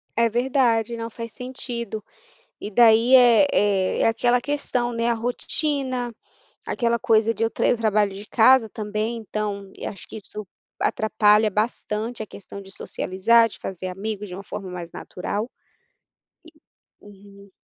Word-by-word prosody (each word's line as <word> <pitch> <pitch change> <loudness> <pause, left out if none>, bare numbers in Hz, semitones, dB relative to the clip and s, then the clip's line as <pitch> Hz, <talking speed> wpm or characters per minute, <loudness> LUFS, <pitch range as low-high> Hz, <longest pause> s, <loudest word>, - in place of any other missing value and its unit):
É 230 0 +3
verdade, 240 -2 +1
não 230 0 -5
faz 230 0 -6
sentido, 235 -4 -5 0.6
e 210 - -5
daí, 230 +3 +5
eh 245 +2 +6
eh, 195 -2 +1
é - - +4
aquela 240 +2 +2
questão, 255 -4 -1
né, 230 0 -1
a 235 - +2
rotina, 250 +1 -1 0.5
aquela 235 -1 0
coisa 225 -2 +2
de 225 - -2
eu 225 - +2
tra - - 0
eu - - +4
trabalho 210 -3 +1
de 200 +2 -9
casa 230 0 +5
também 215 +2 -3
então 210 -2 -4
e - - -7
acho 195 - -7
que - - -10
isso 210 -1 -7 0.3
atrapalha 215 0 +3
bastante 220 +1 -2
a - - -11
questão 200 +1 -10
de 195 0 -14
socializar, 230 +5 +2
de - - -10
fazer 185 -1 -5
amigos 205 +2 -5
de 180 - -7
uma 200 - -8
forma 195 -3 -7
mais 175 -2 -7
natural 205 +6 -4 1.5
e, - - -18
uhum. 200 0 -16
220 Hz, 155 wpm, -23 LUFS, 205-240 Hz, 1.5 s, eh